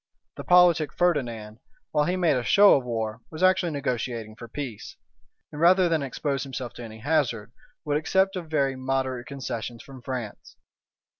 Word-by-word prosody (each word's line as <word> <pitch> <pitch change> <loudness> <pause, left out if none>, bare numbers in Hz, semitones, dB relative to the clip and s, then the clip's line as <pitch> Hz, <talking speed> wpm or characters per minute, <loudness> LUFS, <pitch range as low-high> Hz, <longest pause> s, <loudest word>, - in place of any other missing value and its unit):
The - - -7
politic 175 -4 +5
Ferdinand, 120 -11 -1 0.3
while 150 - +2
he 180 - 0
made 175 -5 +2
a 125 - 0
show 200 - +6
of 135 - 0
war, 110 -3 -3
was 160 +3 -5
actually 185 -2 +3
negotiating 120 -5 -3
for 120 - -10
peace; 120 -4 -7 0.5
and 150 0 -7
rather 180 +2 +5
than 165 -2 +1
expose 135 +1 -2
himself 130 -3 -6
to 120 - -9
any 110 -1 -9
hazard, 125 -7 0 0.3
would 145 -1 +1
accept 190 +5 +1
of 175 -4 -6
very 140 -4 +1
moderate 130 -1 -2
concessions 120 -4 -6
from 135 -2 -12
France. 120 -4 -6
135 Hz, 165 wpm, -26 LUFS, 120-160 Hz, 0.5 s, show